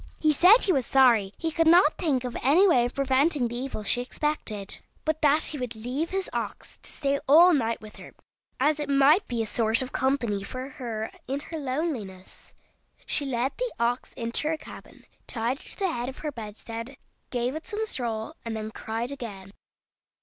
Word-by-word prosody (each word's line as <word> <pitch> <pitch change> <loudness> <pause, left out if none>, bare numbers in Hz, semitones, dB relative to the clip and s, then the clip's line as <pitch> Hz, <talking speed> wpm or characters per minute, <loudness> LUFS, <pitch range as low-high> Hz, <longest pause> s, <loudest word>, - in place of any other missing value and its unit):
He 310 -1 +3
said 370 - +7
he 380 - +3
was 265 -5 0
sorry 235 -7 +4
he 325 -1 -2
could 330 +1 +2
not 330 -2 +6
think 280 -7 +1
of 250 -1 -5
any 320 +10 +5
way 250 -9 +4
of 245 - -5
preventing 275 0 +2
the 235 - -6
evil 250 -3 -4
she 245 +4 +1
expected, 245 -7 -3 0.3
but 315 0 -1
that 300 +1 +4
he 295 - -2
would 245 -2 -4
leave 255 +9 -3
his 385 0 -2
ox - - -5
to - - -5
stay 280 -1 0
all 345 +5 +8
night 230 -6 0
with 215 -1 -12
her, - - -12 0.4
as 300 +3 +2
it 295 -1 -3
might 280 +7 +4
be 235 -2 -1
a - - -3
sort 225 +3 +2
of 255 - -7
company 245 -7 0
for 255 +6 -6
her 225 -5 -5 0.2
in 270 +2 -2
her 320 +1 -6
loneliness. 255 - -5 0.5
She 285 - 0
led 255 +1 0
the - - -1
ox 240 +2 -1
into 235 +5 -1
her 320 0 0
cabin, - - -13 0.2
tied 235 +3 -1
it - - -8
to - - -3
the 385 -3 0
head 240 -1 -3
of 265 - -9
her 300 - -1
bedstead, 230 +2 -8 0.3
gave 245 +1 -1
it 315 - -7
some 440 -1 -2
straw, 235 - -2
and 230 -1 -4
then 215 0 -5
cried 225 +4 -4
again. 200 -8 -8
260 Hz, 200 wpm, -26 LUFS, 230-305 Hz, 0.5 s, all